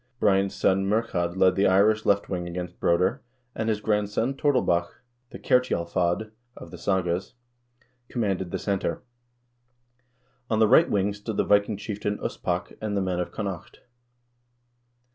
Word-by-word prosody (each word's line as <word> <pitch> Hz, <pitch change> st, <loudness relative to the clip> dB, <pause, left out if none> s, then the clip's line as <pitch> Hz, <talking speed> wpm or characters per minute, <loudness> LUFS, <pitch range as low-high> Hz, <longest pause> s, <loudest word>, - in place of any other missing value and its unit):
Brian's 95 Hz, -1 st, +2 dB
son, 95 Hz, 0 st, +2 dB
Murchad, 95 Hz, -5 st, -1 dB
led 95 Hz, -1 st, +5 dB
the 100 Hz, -, +3 dB
Irish 105 Hz, +3 st, +3 dB
left 100 Hz, 0 st, +2 dB
wing 90 Hz, -2 st, -3 dB
against 90 Hz, 0 st, -6 dB
Broder, 90 Hz, +10 st, +1 dB, 0.3 s
and 110 Hz, 0 st, -2 dB
his 105 Hz, -2 st, 0 dB
grandson, 105 Hz, +4 st, 0 dB
Tordelbach 125 Hz, -, +1 dB, 0.4 s
(the -, -, -9 dB
Kertjalfad 90 Hz, -4 st, 0 dB, 0.3 s
of -, -, -11 dB
the -, -, -10 dB
sagas), 95 Hz, +2 st, -1 dB, 0.7 s
commanded 95 Hz, -6 st, -1 dB
the -, -, -3 dB
center. 95 Hz, -4 st, -2 dB, 1.5 s
On 110 Hz, -, +1 dB
the 110 Hz, 0 st, +5 dB
right 145 Hz, +9 st, +5 dB
wing 100 Hz, 0 st, +1 dB
stood 105 Hz, +1 st, -6 dB
the -, -, +2 dB
Viking 100 Hz, 0 st, +2 dB
chieftain 105 Hz, 0 st, -3 dB
Uspak -, -, -3 dB
and 105 Hz, -2 st, -2 dB
the -, -, +1 dB
men 90 Hz, -1 st, -1 dB
of 90 Hz, -, -3 dB
Connaught. 100 Hz, -5 st, -6 dB
100 Hz, 145 wpm, -26 LUFS, 90-110 Hz, 1.5 s, led